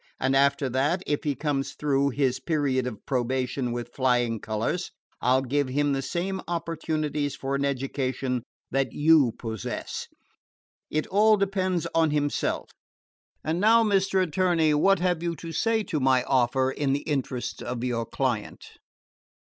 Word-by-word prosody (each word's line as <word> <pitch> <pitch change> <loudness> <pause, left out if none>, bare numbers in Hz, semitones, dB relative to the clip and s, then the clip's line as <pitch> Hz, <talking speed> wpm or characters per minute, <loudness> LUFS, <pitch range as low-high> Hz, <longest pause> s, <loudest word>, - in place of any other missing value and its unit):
And 135 +1 +1
after 140 0 +3
that, 145 +8 0
if 145 - -1
he 145 -2 0
comes 140 0 -2
through 140 -1 +1
his 130 -1 0
period 135 -4 0
of 110 -5 -7
probation 130 0 -1
with 120 0 -5
flying 120 -3 +1
colors, 110 - -2 0.3
I 125 +1 +3
'll 130 - +2
give 140 +2 0
him 145 +2 +1
the 135 - -1
same 180 +7 -3
opportunities 155 -4 -2
for 135 0 -4
an 140 0 0
education 130 -2 -1 0.3
that 135 -2 0
you 145 -6 +4
possess. 110 -4 -5 0.8
It 155 0 -1
all 215 +2 +4
depends 190 -3 0
on 165 -1 +3
himself. 145 -1 -1 0.7
And 160 +2 -1
now, 225 +3 +5
Mr. 195 -2 +2
Attorney, 170 -2 +2
what 195 +7 +4
have 175 -2 0
you 170 -1 -2
to 165 +1 -8
say 225 +5 +1
to 155 - -2
my 130 -1 +3
offer 130 0 +2
in 135 0 0
the 140 - 0
interests 135 -4 -3
of 120 -1 -4
your 115 -3 -1
client?" - - -2
140 Hz, 155 wpm, -26 LUFS, 130-165 Hz, 0.8 s, now